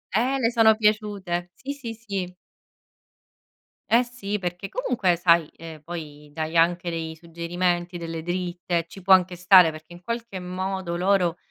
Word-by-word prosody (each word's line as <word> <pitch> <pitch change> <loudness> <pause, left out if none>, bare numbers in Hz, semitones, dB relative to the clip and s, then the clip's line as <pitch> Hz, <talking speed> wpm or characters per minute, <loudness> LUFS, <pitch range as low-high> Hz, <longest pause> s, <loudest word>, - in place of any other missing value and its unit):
eh, 255 +5 +2
le 230 -2 +2
sono 225 -2 +6
piaciute, 205 -5 0
sì, 280 +2 -6
sì, 245 -5 -7
sì. 200 -5 -5 1.6
Eh 235 +2 +5
si, 225 -4 -4
perché 180 +1 -4
comunque 225 - 0
sai, 170 -2 +4
ehm 160 -1 -10
poi, 150 -3 -8
dai 160 +2 -3
anche 175 +1 +3
dei 165 -1 -4
suggerimenti, 175 +1 -2
delle 165 -1 -5
dritte, 175 -1 -2
ci 195 - -12
può 190 +1 +4
anche 180 -1 +5
stare 180 -1 +7
perché 155 +2 -12
in 175 +1 -13
qualche 230 -1 -4
modo 185 -1 -3
loro 180 -2 +2
180 Hz, 150 wpm, -24 LUFS, 170-205 Hz, 1.6 s, stare